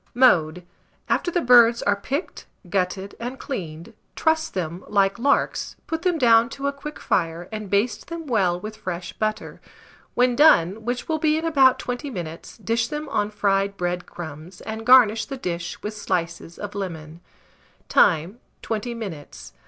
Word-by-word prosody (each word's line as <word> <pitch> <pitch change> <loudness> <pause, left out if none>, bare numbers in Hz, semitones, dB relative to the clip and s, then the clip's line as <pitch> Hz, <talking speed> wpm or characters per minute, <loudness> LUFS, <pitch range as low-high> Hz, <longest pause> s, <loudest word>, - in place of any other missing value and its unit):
Mode. 180 -9 +3 0.4
After - - +1
the 350 0 0
birds 240 -2 +6
are 205 - +2
picked, 275 - -5 0.2
gutted, 190 +1 -2
and 245 +3 -5
cleaned, 170 - -6 0.2
truss 320 0 +1
them 175 -1 -4
like 200 0 +2
larks, 280 +3 +1
put 325 0 -3
them 355 -2 +1
down 235 -3 +5
to 275 - -5
a 280 - 0
quick 295 +2 -8
fire, 170 -1 -1
and 215 -2 -6
baste 205 +2 0
them 335 -1 -6
well 190 -9 +1
with 215 +3 -8
fresh 175 -2 -5
butter. 215 0 -3 0.5
When 245 0 +3
done, 220 - +4
which 245 +1 -3
will 315 -1 -1
be 310 0 +2
in 320 - -3
about 270 -5 +5
20 250 +4 -4
minutes, 170 -8 -7
dish 230 0 -1
them 300 -1 -5
on 210 -4 0
fried 200 -1 0
bread 175 0 -2
crumbs, 165 +2 -9
and 220 +1 -6
garnish 235 -4 +6
the 275 - -6
dish 175 -6 -4
with 210 - -4
slices 170 -4 -3
of 205 0 -6
lemon. 165 -4 -6 0.7
Time. 180 +5 +3 0.2
20 230 +2 -3
minutes. 155 - -8
210 Hz, 160 wpm, -23 LUFS, 180-255 Hz, 0.7 s, birds